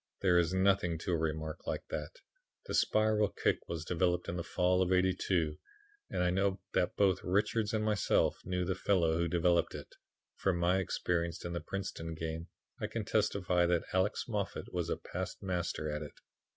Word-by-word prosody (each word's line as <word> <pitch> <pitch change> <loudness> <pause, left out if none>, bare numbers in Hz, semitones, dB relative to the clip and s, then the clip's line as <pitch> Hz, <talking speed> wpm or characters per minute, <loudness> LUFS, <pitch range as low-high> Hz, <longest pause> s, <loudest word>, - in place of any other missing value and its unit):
There 90 -2 +5
is 85 0 +2
nothing 95 -3 +2
to 85 - -3
a - - +3
remark 80 -1 -3
like - - -2
that. - - -5 0.4
The - - -5
spiral 110 -1 +3
kick - - +1
was 80 -2 -4
developed 90 +1 +1
in 85 - -3
the 85 - -2
fall 90 +1 +2
of 95 0 +1
'82, 90 -4 +1 0.5
and - - 0
I 90 - +2
know 95 +1 +1
that 90 - +1
both 95 -2 +3
Richards 105 +3 +1
and 110 -1 0
myself 105 -2 +2
knew 90 0 -1
the 95 - 0
fellow 90 -4 +2
who 85 - +2
developed 85 +1 +2
it. - - -9 0.4
From 95 -3 +1
my 90 +2 +3
experience 85 -2 -1
in 85 - -3
the 85 - -2
Princeton 95 -4 -4
game 80 +1 -4 0.3
I - - -2
can - - -4
testify 90 -3 +2
that 85 -1 +1
Alex 95 +3 +1
Moffat 105 -5 -3
was - - -1
a - - 0
past - - -6
master 90 -4 -2
at 75 0 -3
it. 75 - -9
90 Hz, 185 wpm, -33 LUFS, 85-95 Hz, 0.5 s, There